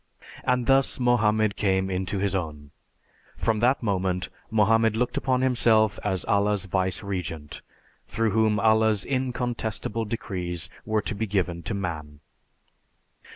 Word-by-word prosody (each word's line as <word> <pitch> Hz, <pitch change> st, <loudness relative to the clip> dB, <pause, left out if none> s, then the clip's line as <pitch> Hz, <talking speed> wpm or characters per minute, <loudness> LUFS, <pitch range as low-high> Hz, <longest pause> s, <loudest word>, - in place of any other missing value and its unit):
And 125 Hz, -1 st, +1 dB
thus 135 Hz, 0 st, +3 dB
Mohammed 110 Hz, -4 st, +2 dB
came 95 Hz, -1 st, +1 dB
into 95 Hz, +2 st, -2 dB
his 100 Hz, 0 st, 0 dB
own. 75 Hz, -6 st, -4 dB, 0.7 s
From 110 Hz, -2 st, 0 dB
that 125 Hz, +3 st, +2 dB
moment 95 Hz, -3 st, -1 dB, 0.2 s
Mohammed 110 Hz, +1 st, +3 dB
looked 125 Hz, +1 st, 0 dB
upon 130 Hz, -1 st, +1 dB
himself 115 Hz, -5 st, +3 dB
as 95 Hz, -3 st, -1 dB
Allah's 100 Hz, -1 st, +1 dB
vice 95 Hz, +1 st, -1 dB
regent, 85 Hz, -6 st, -5 dB, 0.5 s
through 115 Hz, -1 st, 0 dB
whom 110 Hz, 0 st, +2 dB
Allah's 110 Hz, -2 st, +3 dB
incontestable 120 Hz, -4 st, -2 dB
decrees 90 Hz, -8 st, -4 dB, 0.2 s
were 110 Hz, -1 st, +1 dB
to -, -, -2 dB
be 110 Hz, +2 st, -3 dB
given 90 Hz, -4 st, -1 dB
to 110 Hz, -, -3 dB
man." 80 Hz, -6 st, -5 dB
105 Hz, 130 wpm, -26 LUFS, 95-115 Hz, 0.7 s, thus